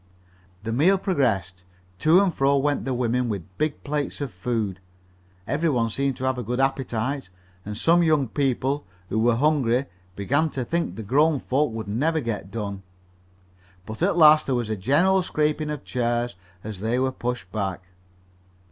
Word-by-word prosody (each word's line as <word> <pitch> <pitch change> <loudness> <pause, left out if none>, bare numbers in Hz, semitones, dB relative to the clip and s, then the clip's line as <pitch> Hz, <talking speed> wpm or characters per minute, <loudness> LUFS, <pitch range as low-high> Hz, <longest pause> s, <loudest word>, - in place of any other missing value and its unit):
The 115 - -3
meal 170 +11 +4
progressed. 95 - -1 0.4
To 165 - +5
and 185 -4 0
fro 140 0 +2
went 145 +1 0
the 135 - -1
women 125 0 0
with 95 -3 -6
big 155 -1 -1
plates 145 0 -3
of 140 -4 -4
food. 100 -1 -2 0.7
Every 160 +8 0
one 115 -5 +1
seemed 135 +1 -1
to - - -7
have 130 -1 0
a - - -3
good 125 +3 -3
appetite, 135 -2 -1 0.3
and 105 +1 -6
some 170 +7 +4
young 155 -5 +3
people, 135 +2 -1 0.2
who 110 - 0
were 115 +1 +3
hungry, 135 -2 +2 0.3
began 140 +11 +1
to 130 - -1
think 170 +5 -1
the 110 - -6
grown 145 +7 +3
folks 135 -2 0
would 110 -2 -5
never 150 +10 0
get 115 -7 -4
done. 100 -3 -5 1.0
But 110 +5 -8
at 180 0 +2
last 155 -2 +7
there 135 - +1
was 120 -3 -2
a - - 0
general 150 - +3
scraping 155 -2 0
of 150 -2 -4
chairs 120 -1 -1 0.3
as 105 -3 -6
they 110 +4 0
were 130 +1 +1
pushed 120 -7 -4
back. 100 -3 -3
130 Hz, 175 wpm, -24 LUFS, 110-150 Hz, 1.0 s, last